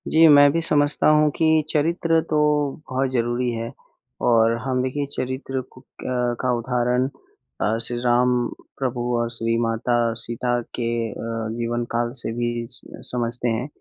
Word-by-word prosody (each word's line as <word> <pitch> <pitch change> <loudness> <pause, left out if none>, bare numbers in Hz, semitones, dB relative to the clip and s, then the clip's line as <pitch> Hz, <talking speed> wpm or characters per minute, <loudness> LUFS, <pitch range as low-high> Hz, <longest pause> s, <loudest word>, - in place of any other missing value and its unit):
जी, 160 +1 +6
मैं 145 -1 +7
भी 165 - 0
समझता 145 -2 +2
हूँ 150 0 +5
कि 160 -1 +3
चरित्र 165 +2 +2
तो 155 - +1 0.5
बहुत 130 +1 0
ज़रूरी 120 0 0
है 115 +1 -4 0.6
और 115 -1 +4
हम 130 -1 -1
देखिए 140 +2 -2
चरित्र 130 +1 -3
को 130 - -16 0.2
क 125 -1 -1
का 125 -1 +1
उदाहरण 125 +1 0 0.5
अ, 110 +2 +1
श्री 120 +1 -1
राम 120 +1 +4 0.5
प्रभु 125 -2 -2 0.2
और 120 0 -1
श्री 115 -1 -1
माता 115 +1 0 0.2
सीता 120 +1 -1 0.2
के 120 -1 -2 0.2
अ, - - -7 0.4
जीवनकाल 120 0 -2
से - - -3
भी 120 0 -2
स 125 - -2 0.3
समझते 120 0 +1
हैं 115 +3 -1
125 Hz, 150 wpm, -23 LUFS, 120-135 Hz, 0.6 s, मैं